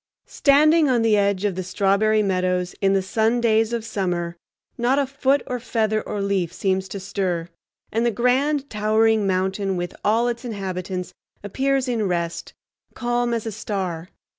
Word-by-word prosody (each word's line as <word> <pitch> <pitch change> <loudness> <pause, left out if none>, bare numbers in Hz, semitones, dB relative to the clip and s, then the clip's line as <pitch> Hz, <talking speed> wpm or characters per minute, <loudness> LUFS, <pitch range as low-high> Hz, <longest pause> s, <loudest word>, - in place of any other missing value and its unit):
Standing 305 +2 +4
on 240 -3 +2
the 220 -2 +4
edge 200 -1 +1
of 200 - +1
the 185 - -4
Strawberry 200 +3 +2
Meadows 180 -2 0
in 195 0 +3
the 195 -1 +1
sun 225 +4 +1
days 225 -1 +2
of 235 -2 -3
summer, 175 -5 -2 0.4
not 245 +3 +1
a 285 - +2
foot 275 +1 +1
or 250 -2 -3
feather 220 -2 0
or 205 -1 -4
leaf 195 -4 0
seems 190 +1 -1
to 200 - -6
stir; 185 -3 -2 0.4
and 225 +1 0
the 240 - +3
grand, 265 +5 +1
towering 215 -1 +2
mountain 190 +1 0
with 175 0 -4
all 225 +3 +2
its 235 0 -3
inhabitants 185 -5 -4 0.3
appears 270 +5 0
in 225 -5 0
rest, 170 -2 -3 0.4
calm 240 0 0
as 230 -1 -2
a 225 - -3
star. 190 -5 -4
210 Hz, 165 wpm, -22 LUFS, 190-240 Hz, 0.4 s, Standing